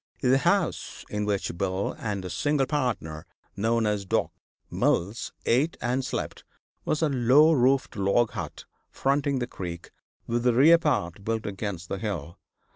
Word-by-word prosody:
The 130 0 +4
house - - 0
in 105 0 -1
which 100 -4 -1
Bill 95 +2 -1
and 100 -4 -3
his 90 -1 -5
single 145 +7 +1
partner, 115 - -2 0.3
known 115 +2 +1
as 105 -1 0
Doc. 95 - 0 0.4
Mills, 100 +7 0
ate 140 +8 +2
and 125 +2 -1
slept, - - -4 0.4
was 155 - 0
a 155 - +3
low 135 +4 +5
roofed 130 -1 +2
log 100 +4 +2
hut - - -6 0.2
fronting 140 0 0
the 125 - -1
creek, 85 -7 -7 0.3
with 120 +1 -1
the 125 -1 +4
rear 160 +6 +7
part 100 - -1
built 110 0 -2
against 95 -3 -4
the 95 - -4
hill. 85 -6 -4
115 Hz, 155 wpm, -26 LUFS, 95-135 Hz, 0.4 s, rear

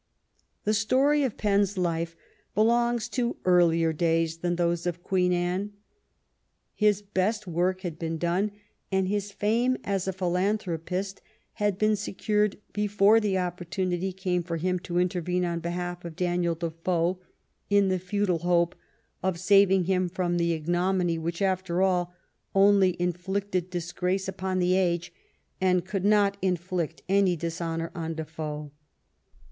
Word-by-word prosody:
The 215 - +1
story 265 +8 +3
of 260 -6 -1
Penn's 200 -1 +1
life 165 -2 -1 0.4
belongs 235 +2 +2
to 240 0 -1
earlier 170 -2 +4
days 165 0 +1
than 175 +1 -1
those 170 0 0
of 175 0 -3
Queen 180 -1 +1
Anne. 180 +3 -1 1.0
His 210 -1 +2
best 205 +2 -1
work 180 +2 0
had 170 -4 -5
been 165 -1 -2
done, 175 +5 0 0.4
and 190 -1 +1
his 205 +1 -2
fame 235 +6 +1
as 195 -2 -1
a - - +1
philanthropist 185 0 -2 0.3
had 205 -3 0
been 215 +1 +3
secured 210 0 0 0.2
before 210 +1 +4
the 205 -3 0
opportunity 180 +1 -2
came 180 -1 -1
for 170 -1 -4
him 180 +2 0
to 175 0 -4
intervene 180 0 0
on 170 -1 -2
behalf 175 +1 -4
of 170 -2 -7
Daniel 175 -1 0
Defoe, 170 +2 -1 0.5
in 200 -1 +4
the 185 -1 +1
futile 185 -1 0
hope 175 0 +2 0.5
of 185 -2 -1
saving 195 0 +5
him 185 0 +1
from 175 -1 -1
the 170 0 +1
ignominy 175 +1 0
which, 170 +3 -3
after 185 -1 +1
all, 180 -2 +1 0.4
only 195 -2 +4
inflicted 185 +1 -2
disgrace 180 +2 -2
upon 190 0 -2
the 180 0 +2
age, 175 -2 0 0.5
and 180 -2 +2
could 190 0 -3
not 205 -1 +3
inflict 180 -3 -2
any 195 -2 +3
dishonor 165 0 -3
on 165 -1 -4
Defoe. 155 -2 -5
180 Hz, 140 wpm, -27 LUFS, 170-200 Hz, 1.0 s, saving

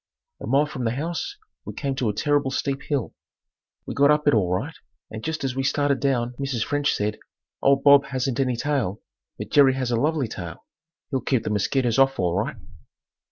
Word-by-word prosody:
A - - -6
mile 140 +2 +3
from 130 -4 -6
the 115 +1 0
house 165 +5 -4 0.3
we - - -8
came 140 -1 -2
to 120 -4 0
a - - -1
terrible 145 +3 +1
steep 135 +1 -2
hill. 140 -6 -2 0.7
We - - -5
got 140 0 +4
up 150 0 +2
it 145 - +5
all 95 -5 +2
right 115 - -2 0.4
and 110 0 -7
just 160 -1 -3
as 130 -1 -2
we 135 - 0
started 140 0 +1
down 125 -3 0
Mrs. 135 -5 -1
French 145 0 0
said, 105 +1 -2 0.4
"Old 135 0 +3
Bob 140 -1 +7
hasn't 130 -2 -2
any 130 -2 +1
tail, 120 -6 -1 0.4
but - - -7
Jerry 135 -2 +5
has 130 -2 -2
a - - +2
lovely 145 +1 +1
tail. 85 -6 -8 0.5
He'll 135 -2 0
keep 130 -5 0
the - - -2
mosquitoes 120 +4 +1
off 135 0 +4
all 90 -2 0
right." 95 - -1
135 Hz, 205 wpm, -24 LUFS, 120-145 Hz, 0.7 s, Bob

